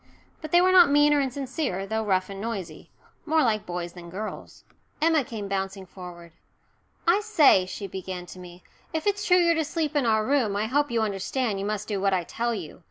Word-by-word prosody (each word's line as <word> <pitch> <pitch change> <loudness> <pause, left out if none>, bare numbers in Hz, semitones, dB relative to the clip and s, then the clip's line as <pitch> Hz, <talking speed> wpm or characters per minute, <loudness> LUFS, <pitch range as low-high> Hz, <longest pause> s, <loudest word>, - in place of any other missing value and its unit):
But 310 -2 -7
they 350 - +6
were 370 +1 +4
not 360 -4 +7
mean 290 +1 +5
or 290 - +3
insincere, 265 - -3
though 220 +2 -2
rough 190 -3 +1
and 195 0 -8
noisy 195 -8 -6 0.3
more 315 0 +2
like 215 -3 0
boys 175 -1 -4
than 175 -1 -11
girls. 210 +5 -7 0.4
Emma 315 -1 +3
came 220 -4 -6
bouncing 195 0 -3
forward. 175 -2 -11 0.8
"I 350 +4 +5
say," 315 - +4
she 200 - -6
began 185 -1 -6
to 185 - -11
me, 180 0 -12 0.3
"if 320 -1 -2
it's 405 0 0
true 365 -4 +4
you're 340 -1 +4
to 320 -1 0
sleep 310 0 -2
in 275 -5 +2
our 220 -1 +2
room 255 -7 +1
I 205 +2 0
hope 285 +5 +1
you 230 -2 0
understand 210 +2 -2
you 195 - -3
must 210 0 -3
do 200 -3 -2
what 195 -1 +2
I 180 - -1
tell 235 +6 -2
you. 175 -6 -8
220 Hz, 215 wpm, -26 LUFS, 190-295 Hz, 0.8 s, not